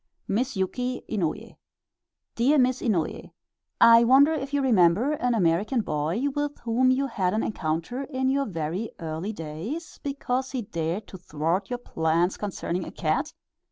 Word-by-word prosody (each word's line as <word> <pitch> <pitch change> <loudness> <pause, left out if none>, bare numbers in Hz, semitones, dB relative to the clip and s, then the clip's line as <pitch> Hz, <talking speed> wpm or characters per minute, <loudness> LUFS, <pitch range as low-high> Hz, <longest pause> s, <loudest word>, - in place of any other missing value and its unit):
Miss 240 +3 -1
YUKI 250 +7 -2
INOUYE 180 -8 -3 0.8
Dear 265 +6 +3
Miss 255 -1 +2
Inouye: 185 -10 -1 0.5
I 230 0 +8
wonder 275 +6 +6
if 275 -3 -4
you 285 - +1
remember 215 - +4
an 250 -5 0
American 205 +6 +2
boy 160 - -2
with 290 0 -2
whom 240 +2 +2
you 260 +2 +2
had 200 -7 -1
an 220 - 0
encounter 165 - -2
in 260 -2 -2
your 275 +1 +1
very 175 +4 -3
early 165 +5 -4
days, 200 - -6
because 265 -2 -2
he 250 -3 -2
dared 170 -1 -3
to 190 - -10
thwart 170 +4 -2
your 245 - -2
plans 170 -5 0
concerning 185 -3 -3
a - - -7
cat? - - -1
220 Hz, 155 wpm, -26 LUFS, 170-260 Hz, 0.8 s, I